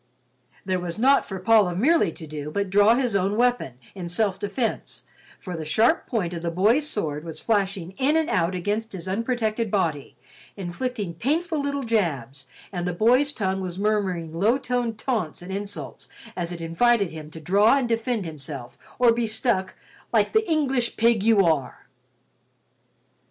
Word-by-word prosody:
There 185 -1 0
was 175 0 -5
naught 270 +5 +4
for 195 - -5
Paul 215 0 +4
of 175 - -4
Merely 290 - +3
to 160 - -9
do 150 -1 -6
but 200 +3 -2
draw 205 +3 +5
his 245 -4 0
own 195 +2 +1
weapon, 245 - +1 0.2
in 180 -3 -6
self 195 +1 0
defense, 220 +3 -3 0.3
for 180 -2 -6
the 160 - -5
sharp 225 - +2
point 190 -8 -1
of 170 - -5
the 170 - -2
boy's 215 - +2
sword 155 - -2
was 160 -2 -4
flashing 195 -5 -1
in 290 +4 +3
and 320 -1 +1
out 185 - +1
against 210 +5 -2
his 185 -1 -6
unprotected 225 +1 -1
body, 165 -8 -1 0.4
inflicting 200 +1 -4
painful 310 - -1
little 280 -1 -2
jabs, 140 - -1 0.2
and 175 -2 -3
the 180 - -1
boy's 250 +10 +3
tongue 190 -7 -2
was 180 -1 -5
murmuring 190 -6 -1
low 210 +9 +2
toned 245 -4 -2
taunts 215 - -2
and 185 - -8
insults 200 +1 -5 0.3
as 175 -1 -3
it 170 -1 -6
invited 200 +4 +2
him 155 -1 -9
to 160 - -10
draw 205 - +4
and 260 -3 0
defend 230 -2 -1
himself 140 -5 -7 0.2
or 245 -1 +5
be 235 0 -1
stuck 215 -4 0 0.4
"like - - +2
the 440 -3 +2
English 270 -6 0
pig 230 -2 +3
you 210 -2 +4
are." 145 -7 -1
200 Hz, 175 wpm, -24 LUFS, 175-235 Hz, 0.4 s, draw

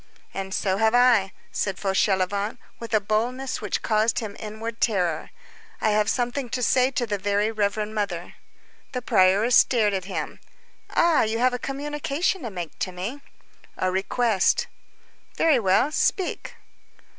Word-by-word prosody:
"And 195 0 -5
so 190 0 0
have 220 +2 +3
I," 240 -6 +4 0.2
said 195 -2 -2
Fauchelevent 200 +2 0 0.2
with 230 - -8
a - - +5
boldness 235 +6 -2
which 210 - -2
caused 220 +1 +1
him 215 -4 -3
inward 220 +2 -6
terror, 180 -8 0 0.5
"I 215 - +2
have 210 0 +2
something 245 +1 -1
to 250 +2 -2
say 255 +2 +3
to 250 -2 -1
the 205 -3 -2
very 205 +2 +1
reverend 210 0 -1
Mother." 195 -5 -3 0.6
The 250 -1 -3
prioress 200 +4 +4
stared 215 -5 +4
at 190 -2 -2
him. 195 - -5 0.5
"Ah! 335 -2 +3
you 220 +1 0
have 250 +2 +2
a 250 - -2
communication 295 +6 -2
to 240 - -4
make 175 -5 -7
to 185 - -2
me." 200 +11 -5 0.6
"A 185 - 0
request." 195 +2 +1 0.7
"Very 315 -6 +4
well, 195 +7 +2
speak." 370 +3 -1
215 Hz, 150 wpm, -24 LUFS, 195-245 Hz, 0.7 s, a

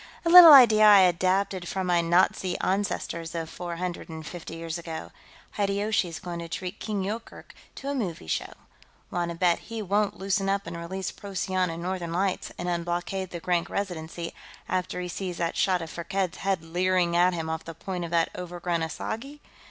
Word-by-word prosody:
A - - +2
little 350 -2 +12
idea 235 -6 +8
I 205 -2 +9
adapted 185 +1 +1
from 190 -1 -2
my 175 -1 +3
Nazi 175 +2 +2
ancestors 175 -4 -2
of 165 -1 -4
four 175 -1 -5
hundred 180 0 -5
and 160 -1 -8
fifty 165 0 -8
years 165 0 -5
ago. 165 -1 -7 0.5
Hideyoshi's 200 -4 0
going 175 -1 -6
to 170 0 -7
treat 185 +4 -5
King 210 -3 -2
Yoorkerk 220 +4 -6 0.2
to 275 - -8
a 280 - -1
movie 190 - -3
show. 80 - -2 0.6
Want 175 -1 -1
to 170 - -5
bet 175 -1 +3
he 230 0 -4
won't 205 +1 0
loosen 195 0 0
up 200 0 0
and - - -6
release 180 +3 -4
Procyon 185 -2 -2
and 165 +1 -5
Northern 180 -2 -3
Lights 190 +1 -1
and 175 - -4
unblockade 175 +2 -2
the 170 - -6
Grank 175 0 0
Residency 170 -3 -4 0.3
after 180 0 -2
he 180 - -4
sees 180 0 -5
that 170 -1 -1
shot 185 -3 +1
of 160 - -8
Firkked's 175 +2 -3
head 190 -4 -1
leering 175 +1 +1
at 180 +1 +4
him 165 -1 -3
off 160 0 -3
the 165 - -8
point 180 +1 -5
of 170 - -4
that 165 -1 +2
overgrown 175 -1 -3
asagai? 230 - -5
180 Hz, 190 wpm, -27 LUFS, 170-195 Hz, 0.6 s, little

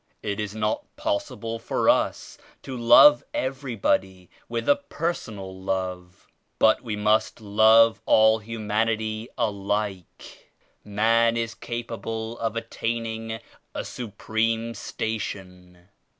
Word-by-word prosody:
It 100 0 -3
is 105 0 -4
not 105 0 -1
possible 300 - -3
for - - -1
us - - +1 0.3
to 130 - -6
love 120 - +7
every 130 -1 -3
body 95 -3 -1 0.2
with 115 0 -3
a 285 - +5
personal 115 - -5
love, 95 -1 -4 0.3
but 110 - +4
we 115 -4 -4
must 105 +2 +1
love 110 +2 +5
all 110 0 +5
humanity 110 +1 -2
alike. 100 -2 -3 0.3
Man 115 +3 +2
is 115 -1 -2
capable 115 -1 -5
of 115 -1 -2
attaining 115 -1 -4 0.3
a - - -3
supreme 115 +1 -2
station. 90 -4 -6
110 Hz, 105 wpm, -25 LUFS, 105-115 Hz, 0.3 s, love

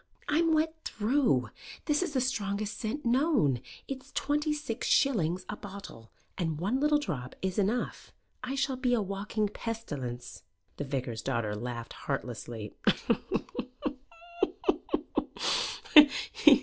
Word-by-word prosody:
"I'm 325 +2 +3
wet 315 0 +3
through. 215 - +2 0.3
This 295 0 +2
is 360 -4 -1
the 260 - +2
strongest 210 -4 -1
scent 245 +6 -3
known. 240 - +3 0.3
It's 270 0 -6
twenty 295 +2 +1
six 295 -7 -2
shillings 185 - +3
a - - -3
bottle, 195 - -9 0.3
and 160 -4 -1
one 210 +10 +1
little 295 +1 +4
drop 150 - -4
is 190 +1 0
enough. 215 +5 -1 0.3
I 255 +2 -2
shall 275 -1 0
be 250 -1 +2
a 225 - +1
walking 200 +2 -1
pestilence." 145 - -5 0.4
The 145 - -3
vicar's 130 -4 -2
daughter 115 -6 -1
laughed 120 +1 -5
heartlessly. 120 -5 -4
210 Hz, 115 wpm, -30 LUFS, -, 0.4 s, little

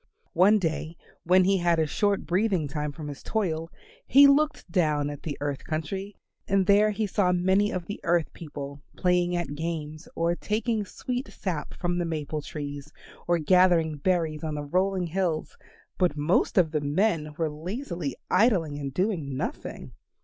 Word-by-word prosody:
One 195 +5 +5
day 165 -2 -2 0.3
when 185 +2 +5
he 195 +1 +3
had 170 -1 +2
a 160 - +2
short 200 +6 0
breathing 185 -3 +1
time 150 +1 -3
from 150 +1 -8
his 145 -1 -7
toil 165 -7 -2 0.4
he 280 +2 +8
looked 295 +2 +3
down 150 -4 +1
at 145 - -8
the 145 -3 -5
earth 145 -2 -3
country 190 +6 -4 0.3
and 195 -1 +2
there 205 +2 +5
he 215 +1 -1
saw 190 -2 +1
many 190 +3 +2
of 180 -2 -3
the 205 - -6
earth 170 -2 +1
people 145 -3 -8 0.2
playing 180 -1 +2
at 175 -4 -2
games, 155 0 -5
or 170 +1 +1
taking 215 +2 -1
sweet 250 +6 -4
sap 170 -6 -4
from 175 -1 -1
the 175 - 0
maple 155 -2 -3
trees, 145 0 -7 0.4
or 175 - +3
gathering 170 -2 +3
berries 160 -2 0
on 155 -1 -2
the 145 - -3
rolling 185 +4 0
hills; 170 -2 -2 0.4
but 180 -5 +2
most 150 +8 +1
of 170 -4 +4
the 155 -2 0
men 150 0 0
were 165 - +1
lazily 170 - -4
idling 170 -11 +2
and 135 -2 -5
doing 165 -9 -1
nothing. - - -5
170 Hz, 170 wpm, -27 LUFS, 150-195 Hz, 0.4 s, he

